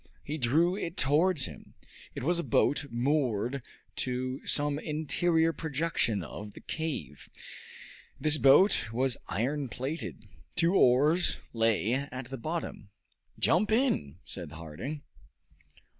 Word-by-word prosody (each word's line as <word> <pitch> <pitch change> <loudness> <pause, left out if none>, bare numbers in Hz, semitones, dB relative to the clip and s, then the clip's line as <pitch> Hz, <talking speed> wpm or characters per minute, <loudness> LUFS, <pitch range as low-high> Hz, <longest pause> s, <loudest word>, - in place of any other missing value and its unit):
He 155 +2 -4
drew 160 +9 +3
it 175 -4 -5
towards 150 +2 +3
him. 75 -6 -11 0.4
It - - -5
was 170 +4 +2
a - - -1
boat, 145 +4 +2
moored 125 -1 0 0.4
to 130 +1 -2
some 145 0 +2
interior 160 +2 +1
projection 145 - -1
of 105 +6 -8
the - - -11
cave. 160 -2 -5 0.9
This 155 -1 +2
boat 135 - +5
was 125 +1 +1
iron 135 +5 -1
plated. 130 -3 -5 0.3
Two 175 0 +3
oars 150 +3 +4 0.2
lay 115 -1 +2
at 130 -1 -4
the 135 - -4
bottom. 155 -8 -4 0.5
"Jump 200 +6 +2
in!" 220 - +1
said 85 -4 -6
Harding. 85 - -6
140 Hz, 120 wpm, -30 LUFS, 120-160 Hz, 0.9 s, boat